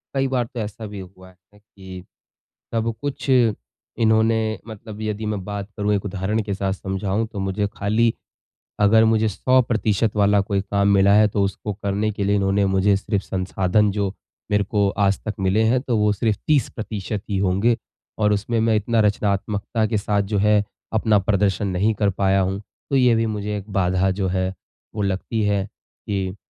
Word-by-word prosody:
कई 135 0 +2
बार 130 -2 0
तो 120 - -4
ऐसा 110 +1 -5
भी 100 -1 -8
हुआ 95 0 -12
है 95 +3 -24
कि 95 -3 -12 0.7
सब 115 0 0
कुछ 145 -1 -4
इन्होंने 110 - +1
मतलब 110 -1 -9
यदि 110 0 -3
मैं 105 -3 -3
बात 100 0 -5
करूँ 105 0 +1
एक 100 - -3
उदाहरण 100 +2 -1
के 100 -1 -3
साथ 95 0 -1
समझाऊँ 95 +3 -2
तो 100 - -6
मुझे 95 +1 -1
खाली 110 +3 +2 0.7
अगर 110 +2 +5
मुझे 110 0 +3
100% 115 -2 +1
वाला 105 0 +4
कोई 100 0 -1
काम 100 0 0
मिला 100 0 +5
है 105 +1 +6
तो 100 0 -1
उसको 100 +2 -3
करने 100 +1 -1
के 100 -1 -3
लिए 100 +1 +2
इन्होंने 100 0 +2
मुझे 95 +1 +3
सिर्फ़ 100 0 -2
संसाधन 95 +2 +1
जो 100 0 -1 0.4
मेरे 105 0 +3
को 100 0 +1
आज 100 -1 +2
तक 110 - -2
मिले 95 +3 +2
हैं, 120 +3 +3
तो 125 -4 -1
वो 105 0 +3
सिर्फ़ 105 0 0
30% 110 -8 -1
ही 100 - 0
होंगे 100 +5 +2 0.4
और 105 -1 +2
उसमें 110 +3 -1
मैं 110 0 +2
इतना 110 +2 +1
रचनात्मकता 105 +1 0
के 110 0 0
साथ 100 0 0
जो - - +3
है 105 0 +3 0.3
अपना 110 -1 +3
प्रदर्शन 100 +1 +1
नहीं 100 +4 +1
कर 100 - +4
पाया 95 0 +2
हूँ। 95 +1 -1 0.3
तो 140 - 0
ये 125 -3 +5
भी 115 0 +1
मुझे 105 -1 -3
एक 100 +1 -9
बाधा 95 0 +2
जो 95 - +1
है 95 0 -1 0.4
वो 105 - -2
लगती 100 +3 -1
है 100 -1 +1
कि, 95 -2 -6
105 Hz, 185 wpm, -22 LUFS, 95-110 Hz, 0.7 s, है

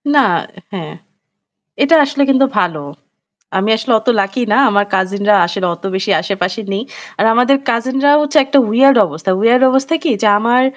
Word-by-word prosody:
না 280 -2 +4 0.5
হ্যাঁ। 165 -5 -7 0.9
এটা 305 +4 +3
আসলে 285 0 -2
কিন্তু 270 0 +3
ভালো। 165 -6 -2 0.8
আমি 195 +3 -1
আসলে 225 +2 -3
অত 220 - -8
লাকি 195 +6 -3
না। - - +3
আমার 205 0 +1
কাজিনরা 200 +2 0
আসলে 180 +2 -4
অত 190 - -19
বেশি 190 +2 -3
আশেপাশে 190 +1 -4
নেই। 195 +2 -3 0.4
আর 210 - +1
আমাদের 250 +3 +3
কাজিনরাও 265 +5 +1
হচ্ছে 295 +1 +1
একটা 280 +1 +1
weird 270 +3 +4
অবস্থা। 160 +5 -5
weird 245 +3 +2
অবস্থা 270 +4 0
কি, 335 - -1
যে 215 - +2
আমার 240 +4 +1
230 Hz, 165 wpm, -14 LUFS, 195-270 Hz, 0.9 s, না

